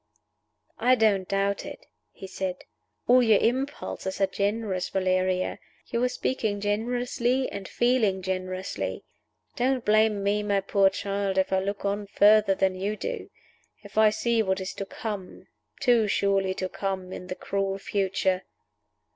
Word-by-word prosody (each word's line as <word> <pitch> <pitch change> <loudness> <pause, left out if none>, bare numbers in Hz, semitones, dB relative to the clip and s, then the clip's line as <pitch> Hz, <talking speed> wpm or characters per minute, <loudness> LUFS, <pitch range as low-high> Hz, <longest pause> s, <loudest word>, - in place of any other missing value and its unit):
"I 255 +1 +5
don't 205 -5 +2
doubt 200 0 0
it," - - -9 0.3
he - - -10
said. 190 -1 -4 0.4
"All 250 +1 +6
your 225 -4 +5
impulses 245 -6 -2
are 195 - +4
generous, 200 -1 -2
Valeria. 185 -1 0 0.3
You 235 - -1
are 250 - +3
speaking 220 -5 -1
generously 245 +4 0
and 200 -1 -6
feeling 225 -6 +1
generously. 185 0 -3 0.5
Don't 255 0 0
blame 215 -1 +3
me, 205 +1 +1
my 200 -1 +1
poor 195 0 +3
child, 195 0 -2
if 190 0 +1
I 190 - +3
look 200 +1 -3
on 200 +1 -1
further 205 0 +5
than 190 0 +2
you 200 +3 -3
do: - - -5 0.5
if 205 - -13
I 220 0 +6
see 225 +2 +1
what 190 -2 0
is 190 0 -4
to 195 - -6
come 205 -3 -6 0.3
too 240 -5 +3
surely 195 -1 +1
to 185 - -2
come 190 -1 -4
in 180 - -8
the 185 - -4
cruel 195 0 -2
future." 190 -1 0
200 Hz, 150 wpm, -26 LUFS, 190-220 Hz, 0.5 s, All